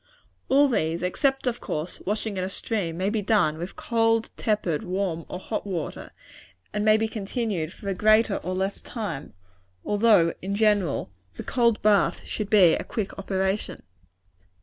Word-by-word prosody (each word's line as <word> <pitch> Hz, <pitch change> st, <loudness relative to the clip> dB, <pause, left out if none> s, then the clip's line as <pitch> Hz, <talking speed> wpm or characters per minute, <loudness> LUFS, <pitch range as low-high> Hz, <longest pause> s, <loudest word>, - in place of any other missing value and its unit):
All 280 Hz, +2 st, +5 dB
these, 170 Hz, -8 st, 0 dB
except, 270 Hz, +10 st, 0 dB
of 240 Hz, -2 st, -1 dB
course, 155 Hz, +3 st, -4 dB
washing 210 Hz, 0 st, -1 dB
in 185 Hz, -, -2 dB
a 185 Hz, -, -2 dB
stream, 190 Hz, -5 st, -3 dB
may 190 Hz, +3 st, 0 dB
be 220 Hz, -1 st, 0 dB
done 185 Hz, -7 st, +2 dB
with 175 Hz, +3 st, -6 dB
cold, 225 Hz, -1 st, +1 dB
tepid, 205 Hz, -8 st, 0 dB
warm 180 Hz, -4 st, -2 dB
or -, -, -4 dB
hot 205 Hz, +2 st, -4 dB
water; 175 Hz, -6 st, -4 dB, 0.6 s
and 210 Hz, 0 st, -1 dB
may 215 Hz, 0 st, +5 dB
be 220 Hz, 0 st, 0 dB
continued 205 Hz, -6 st, -3 dB
for 200 Hz, -, -11 dB
a 195 Hz, -, +1 dB
greater 215 Hz, +2 st, +4 dB
or 185 Hz, +2 st, -4 dB
less 190 Hz, +1 st, -2 dB
time 205 Hz, -, -6 dB, 0.5 s
although, 205 Hz, -6 st, +4 dB
in 195 Hz, +2 st, -3 dB
general, 205 Hz, -, +1 dB, 0.2 s
the -, -, -6 dB
cold 235 Hz, -3 st, +1 dB
bath 210 Hz, -1 st, +3 dB
should 210 Hz, -2 st, -4 dB
be 185 Hz, -6 st, +6 dB
a -, -, -1 dB
quick 210 Hz, -4 st, -4 dB
operation. 195 Hz, +1 st, -2 dB
205 Hz, 165 wpm, -25 LUFS, 180-220 Hz, 0.6 s, be